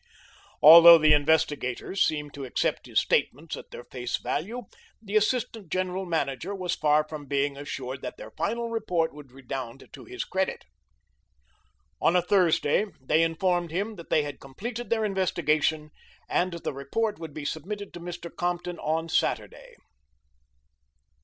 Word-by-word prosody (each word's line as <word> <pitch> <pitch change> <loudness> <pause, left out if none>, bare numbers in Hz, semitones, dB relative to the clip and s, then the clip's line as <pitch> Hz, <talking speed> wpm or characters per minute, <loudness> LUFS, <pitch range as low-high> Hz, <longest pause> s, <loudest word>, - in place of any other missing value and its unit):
Although 170 +2 +11
the 155 -1 +5
investigators 150 +2 +1
seemed 150 -2 0
to 140 - -7
accept 130 - -1
his - - +2
statements 150 +5 0
at - - -11
their - - -9
face 125 -1 -4
value, 225 +12 -3 0.4
the 215 -2 -7
assistant 215 -4 0
general 185 0 -2
manager 160 +3 -2
was 180 -2 -2
far 150 0 +2
from 150 -2 -8
being 140 0 0
assured 135 -2 -6
that 125 - -6
their - - -10
final 235 +9 -2
report 180 -8 0
would 145 -3 -13
redound 130 -1 -7
to - - -11
his 375 +1 -5
credit. 190 0 -2 1.4
On 170 - +3
a 180 - +5
Thursday 185 0 +2
they 150 +5 +2
informed 175 +1 +1
him 200 +7 -3
that 170 - -11
they 155 - +3
had 145 -2 -7
completed 230 - -7
their 220 -2 +1
investigation, 160 -5 0 0.4
and 180 0 0
the 170 -3 -4
report 205 +11 -2
would 160 -3 -8
be 150 - -6
submitted 200 +7 -5
to - - -8
Mr. 175 0 -8
Compton 175 0 -3
on 160 +1 -1
Saturday. 160 - -2
165 Hz, 150 wpm, -27 LUFS, 145-190 Hz, 1.4 s, Although